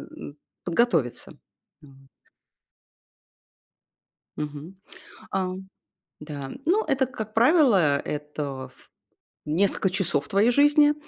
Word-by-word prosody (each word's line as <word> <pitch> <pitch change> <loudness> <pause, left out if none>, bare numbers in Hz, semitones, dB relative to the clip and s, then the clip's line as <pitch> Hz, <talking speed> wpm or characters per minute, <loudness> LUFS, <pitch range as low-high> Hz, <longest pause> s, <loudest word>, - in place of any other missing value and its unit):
м, 310 - -9 0.3
подготовиться, 165 - 0 0.5
вот. 135 -2 -19 2.3
Мгм, 150 +5 -7 0.6
а, 185 -1 -1 0.7
да. 145 -3 -7
Ну, 400 +7 +2
это, 270 -3 +1
как 220 -4 -7
правило, 225 - +4
это 145 -3 -5
в - - -25 0.6
несколько 190 +5 +1
часов 180 -6 0
твоей 205 +4 +3
жизни, 290 +3 +5
185 Hz, 85 wpm, -25 LUFS, 145-240 Hz, 2.3 s, жизни